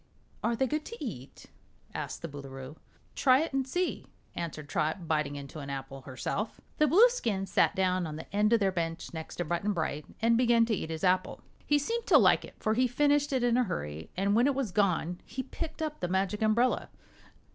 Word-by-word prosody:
"Are 235 Hz, -, +1 dB
they 265 Hz, -, +1 dB
good 300 Hz, +4 st, -1 dB
to 465 Hz, -10 st, -7 dB
eat?" 135 Hz, -, -8 dB, 0.5 s
asked -, -, -5 dB
the -, -, -2 dB
Boolooroo. 135 Hz, -1 st, -8 dB, 0.4 s
"Try 260 Hz, 0 st, +4 dB
it 320 Hz, -, -3 dB
and 270 Hz, -1 st, 0 dB
see," 355 Hz, +6 st, -2 dB, 0.3 s
answered 155 Hz, -3 st, -5 dB
Trot, 160 Hz, +3 st, -1 dB
biting 150 Hz, -2 st, 0 dB
into 140 Hz, +2 st, -8 dB
an 140 Hz, -1 st, -7 dB
apple 135 Hz, 0 st, -6 dB
herself. 135 Hz, -, -4 dB, 0.2 s
The 305 Hz, -, +5 dB
Blueskin 325 Hz, -, +4 dB
sat 190 Hz, -, +2 dB
down 185 Hz, -2 st, +1 dB
on 155 Hz, -, -6 dB
the 155 Hz, -, -7 dB
end 210 Hz, +1 st, +3 dB
of 230 Hz, -, +5 dB
their 195 Hz, -2 st, +2 dB
bench, 165 Hz, -2 st, -3 dB
next 160 Hz, -1 st, -6 dB
to 175 Hz, -, -2 dB
Button 175 Hz, +6 st, 0 dB
Bright, 155 Hz, -4 st, -2 dB
and 230 Hz, +1 st, +3 dB
began 235 Hz, -2 st, +4 dB
to 225 Hz, -, 0 dB
eat 160 Hz, -, -5 dB
his 160 Hz, -1 st, -5 dB
apple. 185 Hz, 0 st, +1 dB, 0.3 s
He 295 Hz, -, +4 dB
seemed 460 Hz, +11 st, -2 dB
to -, -, +7 dB
like -, -, +5 dB
it, -, -, -12 dB
for 215 Hz, -, 0 dB
he 250 Hz, +3 st, +3 dB
finished 290 Hz, +3 st, +2 dB
it 260 Hz, -2 st, +1 dB
in 240 Hz, 0 st, +3 dB
a 250 Hz, -, +4 dB
hurry, 75 Hz, -, -5 dB
and 200 Hz, +2 st, +2 dB
when 240 Hz, +4 st, +4 dB
it 280 Hz, -, +1 dB
was 265 Hz, -7 st, -1 dB
gone 180 Hz, -3 st, +1 dB
he 260 Hz, -, -5 dB
picked 320 Hz, +3 st, -5 dB
up 305 Hz, -1 st, -4 dB
the 180 Hz, -, -1 dB
Magic 190 Hz, +3 st, 0 dB
Umbrella. 230 Hz, +4 st, +2 dB
200 Hz, 210 wpm, -30 LUFS, 160-255 Hz, 0.5 s, to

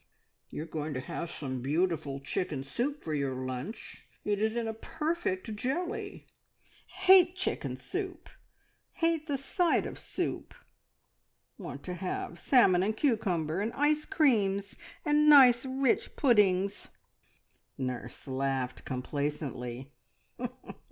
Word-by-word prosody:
"You 150 Hz, -, -5 dB
are -, -, -7 dB
going 155 Hz, -2 st, -4 dB
to -, -, -1 dB
have 160 Hz, +6 st, -5 dB
some 130 Hz, -6 st, -4 dB
beautiful 150 Hz, -1 st, 0 dB
chicken 145 Hz, -1 st, -2 dB
soup 250 Hz, -, -3 dB
for 155 Hz, -, -3 dB
your 140 Hz, -3 st, -1 dB
lunch. 130 Hz, -, -6 dB, 0.2 s
It 205 Hz, -1 st, 0 dB
is 220 Hz, +1 st, +1 dB
in 235 Hz, -1 st, -1 dB
a 220 Hz, -, -2 dB
perfect 300 Hz, -, -3 dB
jelly." 360 Hz, -, -3 dB, 0.6 s
"Hate 375 Hz, -1 st, +6 dB
chicken 375 Hz, -, -2 dB
soup! -, -, -5 dB, 0.7 s
Hate 330 Hz, -2 st, +1 dB
the 285 Hz, -2 st, 0 dB
sight 340 Hz, +6 st, +1 dB
of -, -, -6 dB
soup! -, -, -4 dB, 1.0 s
Want -, -, -7 dB
to 180 Hz, -, -4 dB
have 180 Hz, -1 st, -4 dB
salmon 190 Hz, -9 st, +5 dB
and 215 Hz, +3 st, 0 dB
cucumber, 190 Hz, -, +1 dB
and 220 Hz, +3 st, -1 dB
ice 300 Hz, +1 st, +2 dB
creams, 205 Hz, -, +2 dB, 0.3 s
and 300 Hz, 0 st, +4 dB
nice 260 Hz, -3 st, +8 dB
rich 265 Hz, -1 st, +1 dB
puddings." 200 Hz, -6 st, +3 dB, 0.9 s
Nurse 125 Hz, -1 st, -5 dB
laughed 130 Hz, -1 st, -2 dB
complacently. 130 Hz, -1 st, -4 dB
200 Hz, 120 wpm, -30 LUFS, -, 1.0 s, nice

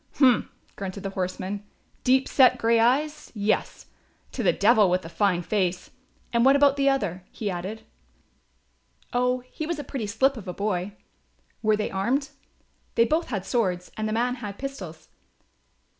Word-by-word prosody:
"Humph," 255 Hz, -5 st, +4 dB, 0.3 s
grunted 195 Hz, 0 st, -6 dB
the 195 Hz, -, -3 dB
horseman, 190 Hz, +2 st, -3 dB, 0.4 s
"deep 260 Hz, +1 st, +3 dB
set 255 Hz, -2 st, +5 dB
grey 230 Hz, -1 st, +3 dB
eyes, 295 Hz, +6 st, +1 dB
yes; 210 Hz, 0 st, -1 dB, 0.5 s
to -, -, -4 dB
the -, -, +4 dB
devil 210 Hz, -1 st, +4 dB
with 180 Hz, +1 st, +1 dB
the 165 Hz, -, -8 dB
fine 175 Hz, +1 st, +1 dB
face! 185 Hz, -2 st, -1 dB, 0.4 s
And 235 Hz, 0 st, +3 dB
what 270 Hz, +2 st, +6 dB
about 280 Hz, -1 st, +5 dB
the 275 Hz, -1 st, +3 dB
other?" 200 Hz, -10 st, -1 dB
he 210 Hz, -3 st, -3 dB
added. 190 Hz, +5 st, -5 dB, 1.3 s
"Oh, 250 Hz, +1 st, +1 dB
he 280 Hz, +5 st, -7 dB
was 340 Hz, -1 st, -2 dB
a 295 Hz, -, -5 dB
pretty 255 Hz, -5 st, -4 dB
slip 265 Hz, +6 st, +2 dB
of 200 Hz, -4 st, -9 dB
a 180 Hz, -, -3 dB
boy." 200 Hz, -1 st, -2 dB, 0.7 s
"Were 215 Hz, -1 st, +3 dB
they 210 Hz, -, -2 dB
armed?" 260 Hz, +10 st, 0 dB, 0.7 s
"They 230 Hz, -, +5 dB
both 315 Hz, +7 st, 0 dB
had 200 Hz, -6 st, -3 dB
swords 185 Hz, -5 st, -1 dB
and 215 Hz, 0 st, -2 dB
the -, -, -2 dB
man 245 Hz, +2 st, +1 dB
had 200 Hz, -2 st, -6 dB
pistols." 185 Hz, -13 st, -7 dB
215 Hz, 165 wpm, -25 LUFS, 190-260 Hz, 1.3 s, what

